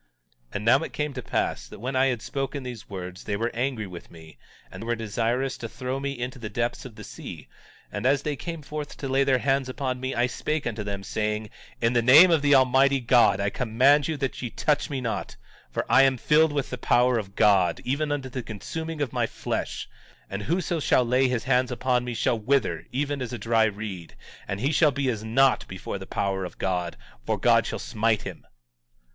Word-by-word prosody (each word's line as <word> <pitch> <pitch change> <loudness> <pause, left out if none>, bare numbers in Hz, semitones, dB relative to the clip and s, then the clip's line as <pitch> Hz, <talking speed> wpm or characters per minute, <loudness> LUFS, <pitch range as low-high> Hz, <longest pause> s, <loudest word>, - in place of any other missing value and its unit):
17:48 - - -19
And 105 - -3
now 125 +4 +6
it - - -6
came 150 -1 -2
to 125 - -5
pass - - -2
that - - -11
when 130 +4 -3
I 130 +1 +4
had 125 -4 -1
spoken 135 0 -3
these 125 -3 -8
words, 90 -2 -7
they 100 - -1
were 115 +3 -1
angry 120 -2 -1
with 90 -3 -10
me, 80 -2 -14 0.3
and - - -8
were 120 +1 -1
desirous 115 +4 -1
to 115 - -5
throw 130 +3 -4
me 140 -1 -3
into 125 +2 -5
the 110 -2 -5
depths 120 +3 -2
of 120 -4 -10
the - - -10
sea; - - -9 0.4
and - - -4
as 140 +1 +2
they 150 -1 -1
came 165 +2 -6
forth 150 0 -6
to 140 - -4
lay 135 +1 +3
their 135 -1 +3
hands 135 0 0
upon 130 -1 -3
me 130 +1 -3
I 120 - +3
spake 150 +4 -2
unto 115 -2 -3
them, 100 -1 -4
saying: 105 +1 -2 0.3
In 115 +1 +2
the 120 - +3
name 150 +10 +8
of 160 -3 +4
the 145 0 +5
Almighty 135 +1 +4
God, 120 -2 +4
I 100 0 0
command 130 +4 +3
you 160 - -2
that 135 -2 -3
ye 125 - -3
touch 150 +5 0
me 135 -3 -3
not, 115 -3 -3 0.3
for - - -2
I 135 - +6
am 135 -1 +4
filled 150 +6 +4
with 145 -2 -2
the 125 - -4
power 120 0 +3
of 100 -2 -8
God, 95 -4 +4
even 145 +4 0
unto 140 -2 -2
the 130 0 -5
consuming 155 - -6
of 135 -5 -2
my - - +1
flesh; - - -4 0.4
and 100 +1 -3
whoso 170 - -1
shall 130 -3 +3
lay 125 +2 +3
his 125 -2 -1
hands 125 0 +2
upon 125 0 +1
me 120 -1 -4
shall 115 0 +1
wither 110 - 0
even 140 +1 -2
as 125 -1 -4
a - - -3
dried 110 -1 +2
reed; 95 -6 -7 0.3
and 100 +1 -3
he 135 +4 +1
shall 155 0 +4
be 140 -1 -1
as 110 -2 -5
naught 130 +4 +3
before 95 +1 -6
the 95 - -9
power 95 -1 -1
of 90 - -7
God, 90 -2 -2 0.3
for - - -1
God - - +4
shall - - -3
smite 110 0 0
him. - - -8
125 Hz, 225 wpm, -26 LUFS, 110-135 Hz, 0.4 s, name